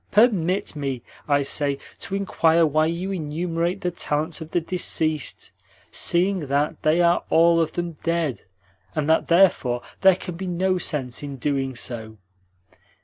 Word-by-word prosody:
"Permit 195 Hz, -6 st, +2 dB
me, 135 Hz, -4 st, -3 dB, 0.2 s
I 145 Hz, -1 st, +3 dB
say, 140 Hz, 0 st, 0 dB, 0.2 s
to 195 Hz, -, -3 dB
inquire 170 Hz, -4 st, +3 dB
why 155 Hz, +1 st, +2 dB
you 175 Hz, +4 st, -3 dB
enumerate 170 Hz, +2 st, -2 dB
the 180 Hz, -, -1 dB
talents 155 Hz, 0 st, -2 dB
of 160 Hz, -, -7 dB
the 175 Hz, -, +1 dB
deceased, 160 Hz, -3 st, -2 dB, 0.4 s
seeing 185 Hz, +3 st, +2 dB
that 145 Hz, +2 st, 0 dB
they 160 Hz, +3 st, +3 dB
are 170 Hz, 0 st, +3 dB
all 165 Hz, 0 st, +5 dB
of 160 Hz, -, -1 dB
them 175 Hz, -2 st, -4 dB
dead, 165 Hz, -6 st, -1 dB, 0.5 s
and 150 Hz, -1 st, -1 dB
that 160 Hz, 0 st, +3 dB
therefore 165 Hz, -9 st, +3 dB, 0.2 s
there 190 Hz, -1 st, +7 dB
can 180 Hz, -1 st, -6 dB
be 190 Hz, +1 st, -5 dB
no 185 Hz, +1 st, 0 dB
sense 130 Hz, -7 st, -2 dB
in 140 Hz, -1 st, -6 dB
doing 135 Hz, 0 st, -2 dB
so. 110 Hz, -3 st, -5 dB
165 Hz, 150 wpm, -23 LUFS, 145-175 Hz, 0.5 s, there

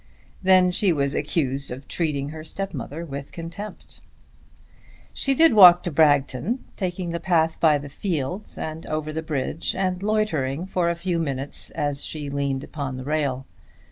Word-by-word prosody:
Then 185 Hz, -1 st, +5 dB
she 190 Hz, +1 st, +2 dB
was 140 Hz, -3 st, +1 dB
accused 140 Hz, -4 st, -1 dB
of 130 Hz, +2 st, -8 dB
treating 145 Hz, -4 st, -2 dB
her 155 Hz, +1 st, -8 dB
stepmother 165 Hz, -3 st, -5 dB
with 140 Hz, -2 st, -7 dB
contempt. 170 Hz, +5 st, -9 dB, 1.1 s
She 275 Hz, -1 st, +1 dB
did 325 Hz, -1 st, +6 dB
walk 180 Hz, -4 st, +9 dB
to 175 Hz, -, -2 dB
Bragton, 145 Hz, -, +2 dB
taking 180 Hz, -2 st, -3 dB
the 170 Hz, -, -2 dB
path 165 Hz, -2 st, +1 dB
by 155 Hz, -3 st, +5 dB
the 145 Hz, 0 st, -7 dB
fields 175 Hz, +4 st, -3 dB
and 160 Hz, +1 st, -5 dB
over 155 Hz, 0 st, -3 dB
the 160 Hz, -, -2 dB
bridge, 155 Hz, 0 st, -2 dB
and 185 Hz, -1 st, -1 dB
loitering 180 Hz, -9 st, 0 dB
for 180 Hz, -2 st, 0 dB
a 170 Hz, -, 0 dB
few 170 Hz, 0 st, -2 dB
minutes 140 Hz, -3 st, -1 dB
as 145 Hz, -1 st, -2 dB
she 145 Hz, -3 st, -5 dB
leant 140 Hz, -1 st, -1 dB
upon 140 Hz, -4 st, -5 dB
the 130 Hz, -, -7 dB
rail. 140 Hz, -3 st, -1 dB
160 Hz, 160 wpm, -24 LUFS, 140-180 Hz, 1.1 s, walk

